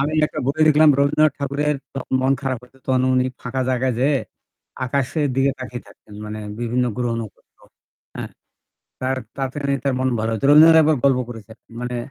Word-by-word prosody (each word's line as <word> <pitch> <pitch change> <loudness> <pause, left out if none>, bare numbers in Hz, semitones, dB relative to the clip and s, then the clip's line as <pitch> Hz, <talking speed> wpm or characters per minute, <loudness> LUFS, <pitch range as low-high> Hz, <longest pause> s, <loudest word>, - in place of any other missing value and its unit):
আমি 145 +3 0
একটা - - -8
বই 145 +3 -1
দেখলাম 155 +1 +6
রবীন্দ্রনাথ 150 +2 +3
ঠাকুরের 145 +1 -1 0.4
মন 130 +1 +2
খারাপ 135 -3 -2
হয়েছে 125 +2 -19
তখন 130 -1 +2
উনি 125 - +3 0.2
ফাঁকা 130 +1 -4
জায়গায় 130 0 0
যেয়ে 140 +3 +2 0.7
আকাশের 140 +4 -1
দিকে 135 +1 +3
তাকিয়ে 125 -1 -7
থাকতেন। 105 - -17
মানে 105 0 -6 0.2
বিভিন্ন 120 +1 0
গ্রহ-নখত্র। 115 -3 -4 0.7
হ্যাঁ - - -5 0.7
তার 130 +1 -1 0.2
তাড়াতাড়ি 140 +1 -2
তার 140 -1 +1
মন 130 - +1
ভালো 110 +1 -1
হয়েছে। 110 +3 -2
রবীন্দ্রনাথ 160 +2 +8
একবার 155 -1 +3
গল্প 135 -2 +4
করেছে 115 -2 -10 0.3
মানে 125 0 -4
130 Hz, 165 wpm, -21 LUFS, 125-140 Hz, 0.7 s, রবীন্দ্রনাথ